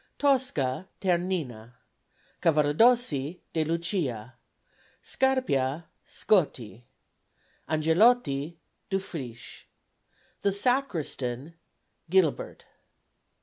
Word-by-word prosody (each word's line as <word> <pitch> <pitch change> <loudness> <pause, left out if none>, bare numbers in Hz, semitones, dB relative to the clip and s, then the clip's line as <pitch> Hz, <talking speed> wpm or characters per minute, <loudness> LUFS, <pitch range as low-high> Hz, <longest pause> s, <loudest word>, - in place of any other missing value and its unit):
Tosca 190 - +1
TERNINA. 170 - -2 0.7
Cavaradossi 155 - +3
DE 160 - +1
LUCIA. 155 - -2 0.7
Scarpia 165 - 0
SCOTTI. 125 - 0 0.9
Angelotti 160 - +2 0.3
DUFRICHE. 135 - -6 0.7
The 200 - +2
Sacristan 170 - -1 0.6
GILIBERT. 180 -4 +1
160 Hz, 55 wpm, -27 LUFS, 135-195 Hz, 0.9 s, Cavaradossi